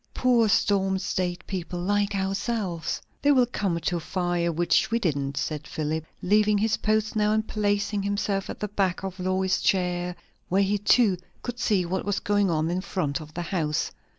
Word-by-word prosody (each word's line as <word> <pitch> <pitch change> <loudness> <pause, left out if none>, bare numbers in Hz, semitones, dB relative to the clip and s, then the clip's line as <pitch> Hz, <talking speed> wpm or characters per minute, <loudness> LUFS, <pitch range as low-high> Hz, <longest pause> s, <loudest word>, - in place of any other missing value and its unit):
Poor 240 -3 +3
storm 195 -1 +2
stayed 180 -1 -2
people, 180 -2 -4
like 205 +2 +1
ourselves." 195 -2 -2 0.2
"They 290 - +4
will 255 -3 +5
come 195 -8 -1
to 175 +1 -1
a - - -3
fire, 175 0 -1
which 170 +2 +2
we 230 - +2
didn't," 140 -9 -1
said 150 -1 -3
Philip, 155 +1 -2 0.2
leaving 210 +2 +4
his 215 +2 +2
post 215 0 0
now 210 -1 +2
and 220 0 0
placing 205 -1 0
himself 200 0 -1
at - - -6
the 210 - -1
back 195 -3 -1
of 190 0 -5
Lois's 185 +1 +1
chair, 180 -1 0 0.3
where 195 +2 +3
he 200 +1 +1
too 205 -2 +4 0.3
could 245 0 -5
see 200 -6 +2
what 185 +2 -2
was 205 -1 -1
going 205 -1 +1
on 160 0 0
in 180 +1 -1
front 170 -6 -2
of 155 0 -12
the 175 - -2
house. 160 -3 -1
190 Hz, 185 wpm, -26 LUFS, 175-205 Hz, 0.3 s, will